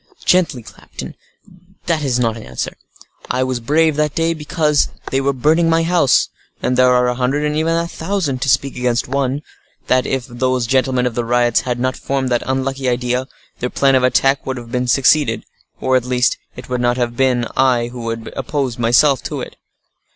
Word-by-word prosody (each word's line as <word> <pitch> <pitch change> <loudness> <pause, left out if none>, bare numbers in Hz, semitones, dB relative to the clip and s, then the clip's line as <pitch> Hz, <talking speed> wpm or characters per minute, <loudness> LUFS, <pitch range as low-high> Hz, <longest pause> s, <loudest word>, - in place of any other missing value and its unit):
"Gently, 165 -9 +2
captain, - - -10 0.7
that 165 -3 0
is 130 -3 +1
not 115 -3 0
an 115 - -8
answer. 65 - -5 0.5
I 130 - +1
was 130 -1 -2
brave 150 +5 +2
that 150 -1 0
day, 165 0 +1
because 150 -1 +1 0.2
they 135 - +1
were 140 +1 +1
burning 155 +6 +2
my 165 0 +3
house, 170 -5 +3 0.3
and 125 - 0
there 130 0 +5
are 125 0 +3
a 125 - +1
hundred, 130 +4 0
and 150 0 -1
even 160 +2 +1
a 170 0 0
thousand, 165 -7 -2
to 140 - 0
speak 130 +2 +1
against 125 -1 0
one, 135 +2 -1 0.4
that 130 0 +2
if 130 -2 -2
those 130 0 -1
gentlemen 130 0 +1
of 125 - -1
the 120 - -1
riots 120 0 +2
had 125 -1 -3
not 130 +1 0
formed 135 -1 -2
that 120 -1 +1
unlucky 135 0 -1
idea, 125 +1 -1 0.3
their 125 - -2
plan 135 +1 +2
of 130 - +4
attack 135 +2 +2
would 130 -1 -4
have 125 +1 -3
succeeded, 140 +4 +3 0.3
or, 130 0 +1
at 125 -1 +1
least, 125 0 +2 0.2
it 125 - -10
would 125 -1 -2
not 120 0 +1
have 120 -1 -1
been 125 -2 +2
I 125 -3 +2
who 120 0 -8
would 115 0 -4
have - - -9
opposed 135 -2 -2
myself 125 +4 +4
to - - -4
it. - - -8
130 Hz, 200 wpm, -18 LUFS, 125-140 Hz, 0.7 s, there